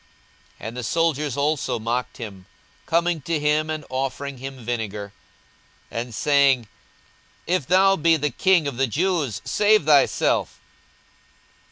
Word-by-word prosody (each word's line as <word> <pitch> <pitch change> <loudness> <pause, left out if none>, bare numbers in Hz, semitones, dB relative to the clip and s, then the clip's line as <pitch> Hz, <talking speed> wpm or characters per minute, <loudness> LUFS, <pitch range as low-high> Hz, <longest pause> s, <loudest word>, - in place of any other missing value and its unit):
42:023:036 - - -7
And 120 - -10
the 125 - -4
soldiers 150 -1 0
also 145 -4 0
mocked 120 +3 -3
him, 100 -7 -9 0.4
coming 170 -1 +1
to 160 +3 -2
him, 150 +1 +1
and 155 -2 -4
offering 135 +1 -3
him 135 -2 -8
vinegar, 105 -4 -4 0.8
42:023:037 115 - -2
And 120 -2 -8
saying, 140 -2 +3 0.8
If 175 -7 0
thou 195 +2 +5
be 165 +1 +3
the 150 -1 -1
king 175 +2 +2
of 135 -4 -5
the 135 0 +2
Jews, 145 - -1
save 210 -5 +3
thyself. 145 -2 +2
140 Hz, 140 wpm, -23 LUFS, 120-160 Hz, 0.8 s, thou